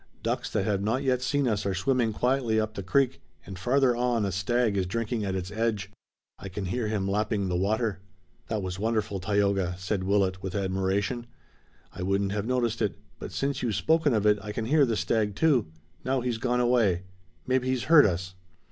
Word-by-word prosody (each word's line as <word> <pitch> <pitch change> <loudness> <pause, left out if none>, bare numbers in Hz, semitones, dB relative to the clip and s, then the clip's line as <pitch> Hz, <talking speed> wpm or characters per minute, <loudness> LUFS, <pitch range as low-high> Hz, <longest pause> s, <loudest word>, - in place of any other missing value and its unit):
Ducks - - -1
that 95 - -1
have 100 -2 0
not 115 +7 0
yet 130 -2 +1
seen 145 0 +1
us 105 -4 0
are 100 -1 -1
swimming 120 +3 +1
quietly 125 -1 +1
up 110 0 -2
the 100 - -5
creek, 130 +8 +1 0.2
and 95 -1 -8
farther 125 +4 +3
on 120 -3 +1
a 100 - -1
stag 110 +4 +1
is 95 -2 0
drinking 115 +2 -2
at 95 -2 -2
its 95 +1 -4
edge. 105 -2 -1 0.5
I 100 - -7
can 95 +2 -5
hear 115 +4 -2
him 105 -3 -1
lapping 105 0 0
the 90 - -1
water." 105 +2 0 0.5
"That 110 -3 -2
was 90 0 -4
wonderful, 110 -2 -1
Tayoga," 100 -2 +1
said 95 +1 -2
Willet 95 -1 +1
with 95 0 -5
admiration. 100 +5 -1 0.7
"I - - -7
wouldn't 100 +1 0
have 105 +1 -2
noticed 120 -3 0
it, 105 -3 0 0.2
but - - -7
since 140 0 -2
you've 115 -5 -1
spoken 160 - +2
of 105 -1 0
it 105 0 +4
I 105 - -6
can 110 +1 -3
hear 145 +2 +4
the 115 -2 0
stag 105 -3 0
too. 140 - +3 0.4
Now 130 0 0
he's 120 -2 -2
gone 125 +1 0
away. 115 -8 +2 0.4
Maybe 130 0 +1
he's 130 -2 0
heard 155 -6 +7
us." 90 0 -3
105 Hz, 200 wpm, -27 LUFS, 95-125 Hz, 0.7 s, heard